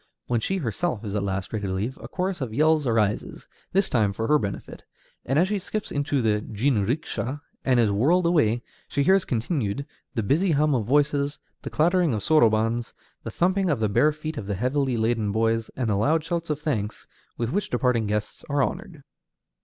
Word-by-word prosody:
When 120 -1 0
she 190 - -1
herself 125 - -2
is 100 - -4
at 105 - 0
last 95 0 -3
ready 105 -2 -2
to 95 - -2
leave, 110 +8 -2
a - - -7
chorus 185 -2 -3
of 115 -4 -4
yells 155 -1 +3
arises, 110 -3 0 0.2
this 195 +1 +2
time 105 -5 +1
for 110 +3 -3
her 150 0 +5
benefit; 100 -2 -6 0.4
and 135 - +1
as 175 +4 +4
she 205 0 -1
skips 210 +3 -5
into 145 -2 0
the 105 -1 +2
jinrikisha 120 +4 -1 0.2
and 130 -2 +3
is 110 -3 +3
whirled 155 - +3
away, 120 -9 +2 0.2
she 140 - 0
hears 190 +4 +4
continued 120 - -1 0.3
the 115 - 0
busy 160 - +2
hum 150 +1 +3
of 115 -5 0
voices, 145 +1 +1 0.2
the - - -5
clattering 170 -3 +2
of 105 - -3
sorobans, 115 -5 +2 0.3
the - - -6
thumping 185 +1 +1
of 145 -6 +1
the 110 -1 +1
bare 150 +9 +4
feet 155 +1 -6
of 100 - -7
the 100 - -1
heavily 130 +3 0
laden 110 -2 0
boys, 115 +1 +1
and 125 -3 -1
the - - +2
loud 150 +10 +2
shouts 170 0 -3
of 150 -1 -1
thanks 115 -9 -3 0.3
with 115 0 -2
which 205 +3 -1
departing 120 -3 +1
guests 105 0 -3
are 140 -1 +2
honored. 175 -4 -5
130 Hz, 200 wpm, -25 LUFS, 110-155 Hz, 0.4 s, her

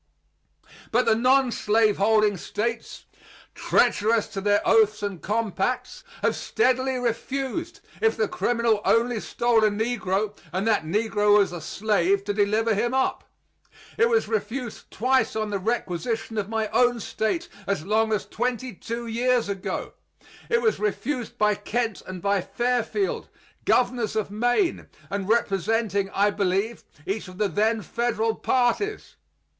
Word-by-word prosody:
But 245 +2 +2
the 225 - +4
nonslaveholding 220 -4 +3
States, 230 +6 -4 0.5
treacherous 220 +1 +2
to 195 - -5
their 205 +1 +2
oaths 215 -1 +4
and 200 -4 -4
compacts, 230 +4 -2 0.2
have - - +2
steadily 260 - +1
refused, 270 - -3 0.2
if 445 0 +2
the 450 - +1
criminal 235 - +1
only 235 0 +2
stole 235 0 +1
a 215 - +5
negro 210 -2 -1 0.2
and 190 +4 -1
that 215 -7 +2
negro 210 +3 +2
was 200 -3 +3
a 175 -2 -6
slave, 200 -1 +1
to 205 0 -2
deliver 215 +2 +2
him 240 +5 0
up. 265 - 0 0.7
It 460 +2 +3
was 455 -1 +2
refused 255 - -4
twice 260 +3 +1
on 215 -1 -2
the 200 - -1
requisition 225 +1 -2
of 200 0 -3
my 220 -1 -1
own 245 +1 +3
State 225 - -2 0.2
as 195 -6 -1
long 220 +2 +2
as 210 -3 0
twenty 250 +1 -3
two 230 +5 -5
years 240 0 +1
ago. 195 -2 -4 0.6
It 470 +1 +2
was 445 -2 +2
refused 235 +4 -2
by 210 0 +3
Kent 220 +1 -2
and 185 -2 -7
by 200 -1 +2
Fairfield, 250 - -1 0.4
governors 245 -4 +1
of 215 -2 -1
Maine, 245 - 0 0.2
and 200 0 -3
representing, 210 -2 +1
I 205 +1 +2
believe, 200 +4 -1 0.2
each 200 +1 -3
of 185 0 -11
the 210 0 +1
then 215 +4 +1
federal 230 -1 0
parties. 260 - 0
225 Hz, 140 wpm, -25 LUFS, 205-245 Hz, 0.7 s, a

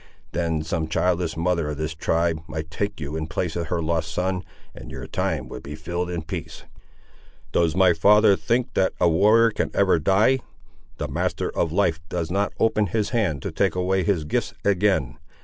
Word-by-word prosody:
Then 80 -3 -1
some 80 -1 -2
childless 85 0 0
mother 85 -2 0
of 75 - -4
this 80 +1 -3
tribe 80 0 0
might 80 0 -6
take 100 +4 -3
you 75 0 -5
in 80 0 -2
the - - -12
place 85 -1 -2
of 85 -2 -2
her 85 -2 -1
lost 80 -1 -1
son, 90 +3 -1 0.3
and - - -10
your - - -7
time - - -2
would - - -7
be 75 +1 -7
filled 85 +3 -3
in 85 -2 -3
peace." - - -7 0.9
"Does 85 -1 +2
my 95 -2 +5
father 105 +4 +5
think 120 +4 -1
that 95 - +2
a 90 - +4
warrior 105 +7 +5
can - - -1
ever 95 -4 +3
die? 100 - +3 0.6
The - - -3
Master - - -2
of 85 - 0
Life 85 -3 +1
does 85 -2 -3
not 100 +2 0
open 110 -2 +2
his 105 +4 -1
hand 95 - 0
to - - -3
take - - +1
away 95 +1 +1
his 90 -4 0
gifts 75 - -2
again. 95 -9 +1
85 Hz, 195 wpm, -24 LUFS, 80-100 Hz, 0.9 s, my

